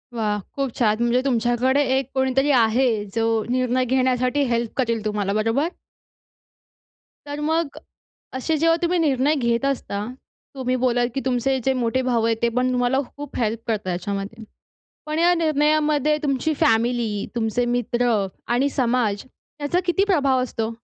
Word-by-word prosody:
वाह! 210 -2 -1 0.2
खूप 275 -3 -1
छान. 215 -3 +3
म्हणजे 240 +2 +2
तुमच्याकडे 250 +2 +2
एक 270 -1 -2
कोणीतरी 265 +2 +2
आहे 235 +4 +3 0.3
जो 225 - +1 0.2
निर्णय 255 0 +1
घेण्यासाठी 255 +2 +1
हेल्प 235 -1 -1
करेल 230 -4 0
तुम्हाला, 205 -2 -1
बरोबर? 230 +9 +1 1.6
तर 290 0 -6
मग 315 -1 -1 0.6
असे 310 +5 -1
जेव्हा 330 +2 +3
तुम्ही 350 +1 +1
निर्णय 290 -1 +2
घेत 235 -1 0
असता, 210 -7 -2 0.5
तुम्ही 255 -1 -1
बोललात 245 -1 +1
की 270 - -1
तुमचे 260 +1 +1
जे 265 - +3
मोठे 250 0 0
भाऊ 245 -3 0
आहेत, 230 -1 +1
ते 235 - +3
पण 250 +2 0
तुम्हाला 250 +2 +1 0.2
खूप 290 -1 -8
हेल्प 225 0 0
करतात 215 -4 -2
याच्यामध्ये. 200 +5 -4 0.6
पण 305 +1 -2
या 345 +1 +4
निर्णयामध्ये 305 -2 +2
तुमची 285 +2 0
फॅमिली, 225 -2 +1
तुमचे 235 +1 0
मित्र 240 -1 +1 0.4
आणि 270 +4 +2
समाज, 240 -6 0 0.3
त्याचा 295 +5 0
किती 385 +3 +2
प्रभाव 275 -10 +2
असतो? 225 -3 -3
255 Hz, 145 wpm, -22 LUFS, 230-280 Hz, 1.6 s, या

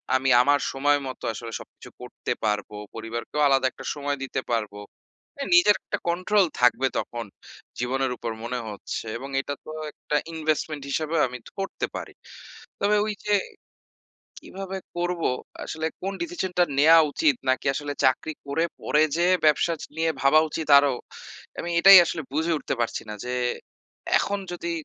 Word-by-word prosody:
আমি 135 +1 +2
আমার 145 +2 +3
সময় 145 +2 +2
মতো 130 - -8
আসলে 115 +2 -7
সবকিছু - - -13
করতে - - -6
পারব। 105 -2 0 0.3
পরিবারকেও 115 +6 -4
আলাদা 135 -1 +3
একটা 130 - -12
সময় 145 -1 -2
দিতে 130 0 -3
পারব। 110 -3 -1 0.7
এহ 275 - -2
নিজের 345 -13 +7
একটা - - -3
কন্ট্রোল 185 +4 +3 0.2
থাকবে 125 +2 +4
তখন। 120 -1 -4 0.5
জীবনের 130 +2 0
উপর 115 0 -4
মনে 125 +1 -3
হচ্ছে। 105 +2 -6
এবং 135 +3 -7
এটা 145 - -4
তো - - -9 0.2
১ - - -27
টা 150 - +3 0.2
ইনভেস্টমেন্ট 155 -2 -2
হিসেবে 155 +2 -1
আমি 125 0 -7 0.2
করতে 195 - -3
পারি। - - -7 0.7
তবে 205 +1 +2
ওই 215 - -1
যে 210 - +2 1.1
কীভাবে 195 0 -6 0.2
করব? 175 -1 -1 0.4
আসলে 160 0 -4 0.2
কোন 195 +1 -3
ডিসিশনটা 190 - 0 0.2
নেওয়া 160 +3 +8
উচিত? 300 - +2
নাকি 130 - +1
আসলে 145 0 -3
চাকরি 135 +4 +2
করে 140 +4 0 0.2
পরে 150 - +2
যেয়ে 175 +2 +3
ব্যবসা 155 +2 +3 0.2
নিয়ে 165 0 +2
ভাবা 140 +3 +6
উচিত 160 -1 -4
আরও, 140 -2 +4 0.7
আমি 175 - -4
এটাই 195 +2 +10
আসলে 165 -1 -3
বুঝে 160 +3 0
উঠতে - - -3
পারছি 115 - -2
না। - - -4
যে 125 - -3 0.9
এখন 200 0 -1
যদি 170 -1 -4
150 Hz, 155 wpm, -25 LUFS, 130-175 Hz, 1.1 s, এটাই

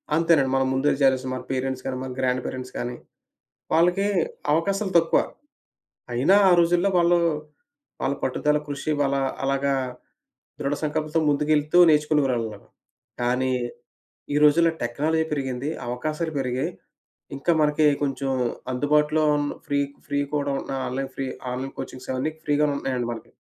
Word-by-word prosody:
అంతేనండి. 160 -5 +3
మనం 135 0 +2
ముందుగా 135 +3 +2
జేయలిసిన 130 -1 +3
మన 130 - -5
పేరెంట్స్ 130 0 -2
గాని, 130 - -2
మన 130 - -5
గ్రాండ్ 130 -1 +1
పేరెంట్స్ 130 0 -6
కాని 120 0 -3 0.8
వాళ్ళకే 175 +5 +3 0.5
అవకాశాలు 195 +5 0
తక్కువ. 165 0 +3 0.9
అయినా 140 +11 +4
ఆ - - +5
రోజుల్లో 175 +3 +3
వాళ్ళు 175 0 +4 0.8
వాళ్ళ 135 - +1
పట్టుదల 150 +3 +1
కృషి, 145 +1 -3
వాళ్ళ 140 -1 +1 0.3
అలాగా 140 0 +1 0.9
దృఢ 140 -1 -1
సంకల్పంతో 155 +1 0
ముందుకెళ్తూ 150 +2 +2
నేర్చుకునేవారన్నమాట. 135 -9 +1 0.6
కానీ, 125 +2 +1 0.8
ఈ - - +3
రోజుల్లో 165 +3 +5
టెక్నాలజీ 155 +7 0
పెరిగింది, 135 -1 -2 0.2
అవకాశాలు 155 +6 -3
పెరిగాయి. 130 -1 -1 0.7
ఇంకా 140 +5 +1
మనకే 150 0 +3 0.2
కొంచెం 135 -1 -1 0.4
అందుబాటులో 150 +3 +2
ఉన్ 145 0 -1 0.2
ఫ్రీ 145 -1 +1 0.3
ఫ్రీ 140 - 0 0.2
కూడా 145 -1 0
ఉన్న - - -8 0.2
ఆన్‌లైన్ 135 +1 -3
ఫ్రీ 135 - -3 0.3
ఆన్‌లైన్ 130 +2 -5
కోచింగ్స్ 130 -1 -7
అవన్నీ 135 +5 -1
ఫ్రీగా 150 0 +2
ఉన్నాయండి 125 -3 -2
మనకి. 115 - -11
140 Hz, 130 wpm, -24 LUFS, 130-155 Hz, 0.9 s, ఆ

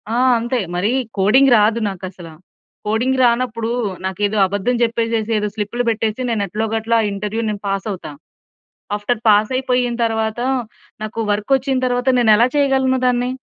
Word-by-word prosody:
ఆ! - - +1 0.2
అంతే. 240 +2 -1 0.2
మరి 190 +6 0 0.3
కోడింగ్ 250 +8 +4
రాదు 215 +2 +3
నాకసల. 185 -2 -8 0.6
కోడింగ్ 240 +5 0
రానప్పుడు 235 -1 +1 0.4
నాకేదో 205 +3 -1
అబద్ధం 205 +6 -1
చెప్పేసేసి, 230 -1 -1
ఏదో 210 0 -1
స్లిప్‌లు 220 +4 -2
పెట్టేసి, 225 +1 -1
నేను 220 -3 0
ఎట్లోగట్ల 225 +3 -2
ఆ 210 - 0
ఇంటర్వ్యూ 210 +3 -3
నేను 205 -1 -4
పాస్ 195 +1 -2
అవుతా. 180 -5 -7 0.8
ఆఫ్టర్ 215 +3 -2
పాస్ 210 0 +4
అయిపోయిన 250 -2 0
తరువాత 220 0 -1 0.6
నాకు 215 +1 -5
వర్క్ 210 +5 -2
వచ్చిన 265 0 -1
తరువాత 245 +1 0
నేనెలా 225 +1 +5
చేయగలను 265 -2 +2
దాన్ని. 245 0 +1
225 Hz, 145 wpm, -19 LUFS, 210-245 Hz, 0.8 s, నేనెలా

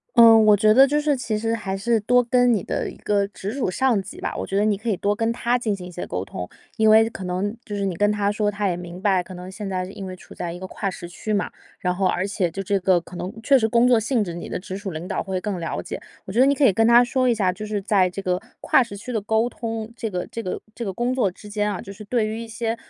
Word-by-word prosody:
嗯， 225 -2 +8
我 210 -1 +6
觉 215 +1 +5
得 265 +4 +7
就 295 +2 +1
是 295 -1 +2
其 230 -4 -2
实 225 +1 -1
还 195 -4 -3
是 225 +3 +1
多 245 +4 +3
跟 245 +1 +3
你 210 -6 +1
的 - - -2
一 - - -10
个 200 -1 0
直 200 0 -6
属 260 -4 -1
上 240 0 +2
级 195 - -10
吧， - - -3
我 - - -4
觉 195 - -1
得 205 - +3
你 215 -1 +2
可 220 +4 -4
以 200 - +1
多 205 +2 0
跟 225 +1 0
他 240 +1 0
进 220 -4 -1
行 180 -2 -9
一 180 - -9
些 175 - -6
沟 90 +1 -3
通。 90 -2 -6 0.3
因 220 0 +4
为 220 +1 +7
可 195 - -7
能 185 +4 -2
就 205 - -6
是 200 -1 -1
你 190 -3 -2
跟 205 +3 +2
他 205 -1 +1
说， 210 0 0
他 205 0 -1
也 180 - 0
明 175 0 -8
白， 190 -1 +2
可 180 +1 -10
能 180 +1 -8
现 200 0 -6
在 185 -1 -2
因 195 +1 -8
为 185 - -6
处 - - -14
在 175 - -4
一 175 - -7
个 185 - -6
跨 200 +1 -3
时 175 -2 -8
区 180 +5 -6
嘛， 205 - 0 0.3
然 180 -1 -1
后 190 0 +1
而 185 - 0
且 190 -3 0
就 195 +4 -5
这 200 +1 +1
个 185 -1 +3
可 175 - -13
能 185 - -4
确 270 +2 +5
实 220 - +2
工 235 +2 +4
作 245 -2 +5
性 225 +1 +1
质， 175 -4 -5
你 170 - -7
的 - - -2
直 185 0 -7
属 200 0 -5
领 165 0 -6
导 - - -2
会 190 -1 -3
更 195 -1 -3
了 165 - -3
解。 - - -6 0.2
我 - - -6
觉 230 - +1
得 260 - +7
你 280 - +3
可 290 - 0
以 215 - +5
跟 225 +3 +3
他 235 +1 +7
说 255 +1 +1
一 235 - +3
下， 190 -4 +1
就 205 +4 -8
是 210 -1 -2
在 195 -2 +2
这 180 - -7
个 180 0 0 0.2
跨 - - +4
时 235 -5 -4
区 245 +5 -7
的 220 - 0
沟 220 +3 +1
通， 225 -2 -5
这 225 -2 -3
个 180 -3 -3
这 230 - -6
个 185 - -4
这 235 - -6
个 200 - -2
工 240 +6 -1
作 250 -6 +2
之 185 +3 -13
间 210 0 -1
啊， 190 - -4
就 195 - -8
是 210 +2 -11
对 220 +1 0
于 215 +1 -3
一 230 - -7
些 225 0 -2
205 Hz, 335 characters per minute, -23 LUFS, 190-230 Hz, 0.3 s, 嗯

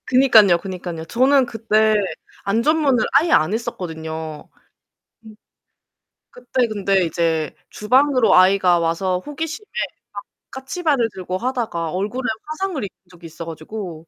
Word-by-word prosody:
그니깐요, 230 -8 +6
그니깐요. 175 -3 -6
저는 260 +7 +3
그때 220 -1 +1 0.5
안전문을 255 +3 +2
아예 305 +5 +4
안 155 +6 +3
했었거든요. 160 -7 -5 0.7
음. 220 -1 -13 1.0
그때 265 - -1
근데 195 -3 +1
이제 160 -2 -1 0.2
주방으로 255 +3 +3
아이가 185 -1 +5
와서 180 +2 -1
호기심에 320 +7 -6 0.5
막 - - -6 0.3
까치발을 270 -2 -1
들고 185 -1 -4
하다가 225 -9 -3
얼굴에 210 +8 -3 0.2
화상을 310 - -3
입은 200 - -7
적이 175 -2 -16
있어 165 +1 -9
가지고 165 0 -8
210 Hz, 295 characters per minute, -20 LUFS, 175-260 Hz, 1.0 s, 그니깐요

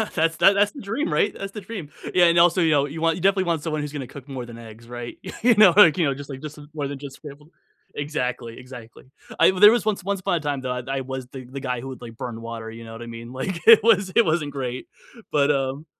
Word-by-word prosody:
That's 165 +1 +1
tha 195 - +6
that's 205 +1 +2
the 280 - -10
dream, 225 +11 -3
right, 205 - +1
that's 195 0 -6
the 210 - -7
dream. 190 -7 -8 0.2
Yeah 180 -1 +5
and 170 0 +4
also, 175 +2 +5
you 160 -2 +3
know, 140 -1 +3
you 155 +3 -7
want 165 0 +2
you 180 - -7
definitely 190 -1 +2
want 165 -3 -1
someone 155 -2 -2
who's 150 0 -6
gonna 140 -4 -5
cook 140 +1 -12
more 130 -3 -6
than 120 -1 -11
eggs, 115 0 -13
right? 120 -1 -7 0.2
You 235 -1 +5
know, 200 -5 +7
like, 170 -7 +7
you 170 - +2
know, 140 - +1
just 140 +1 -10
like 135 -1 -7
just 150 0 -8
more 145 -3 -3
than 140 -1 -6
just 140 -2 -9
scrambled 150 +1 -13 0.4
exactly, 125 -5 -4
exactly. 125 -3 -12 0.3
I - - +6
there 210 +3 +9
was 235 -1 0
once 205 -4 -1
once 200 0 -2
upon 180 - -1
a - - 0
time 145 -2 -2
that 125 0 -4
I 135 - -1
I 135 - -2
was 130 -1 -6
the 130 -1 -10
the 135 +2 -8
guy 125 -2 -2
who 130 - -8
would, 130 - -9
like, 115 -1 -10
burn 115 -2 -6
water, 115 -1 -7
you 115 +1 -10
know 115 - -10
what 115 - -9
I 120 - -7
mean, 115 +1 -9
like 170 +7 -4
it 230 -1 +9
was 200 -4 +3
it 235 - +5
wasn't 155 -2 0
great. 130 -2 -5 0.4
But, 145 -1 +3
um 135 +2 -2
145 Hz, 280 wpm, -23 LUFS, 125-175 Hz, 0.4 s, there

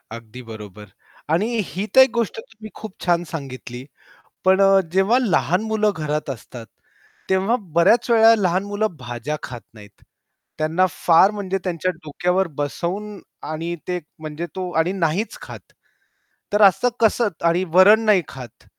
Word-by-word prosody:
अगदी 115 +2 -11
बरोबर 105 -2 -10 0.5
आणि 200 +7 +1 0.2
ही 195 +4 -4
तर 265 - +10
एक 260 - +5
गोष्ट 230 -1 -2
तुम्ही 220 -1 -12
खूप 220 -3 -9
छान 175 -1 +2
सांगितली, 130 -4 -7 0.6
पण 190 +1 +4
अ, 195 0 +5
जेव्हा 195 +6 +3
लहान 195 -4 +1
मुलं 215 -1 +2
घरात 150 -2 -3
असतात, 120 -2 -9 0.6
तेव्हा 195 +6 +2 0.2
बऱ्याच 225 +8 +4
वेळा 225 0 +6
लहान 185 -1 0
मुलं 205 -3 -2
भाज्या 120 +4 -5
खात 120 -2 -7
नाहीत, 105 -2 -16 0.6
त्यांना 160 +4 +1
फार 170 +6 +4
म्हणजे 195 -2 -3
त्यांच्या 185 0 -1
डोक्यावर 180 +5 0
बसवून 190 +8 -4 0.3
आणि 165 +2 -4
ते 180 0 -2 0.2
म्हणजे 155 +2 -6
तो 185 -1 -4
आणि 170 +3 +1
नाहीच 185 +4 -1
खात. - - -9 0.9
तर 210 - +2
असं 200 +5 +5
कसं 225 0 +3 0.2
आणि 175 +2 +2
वरण 200 +4 +7
नाही 205 -4 +4
खात. 125 -5 -12
180 Hz, 145 wpm, -21 LUFS, 150-205 Hz, 0.9 s, तर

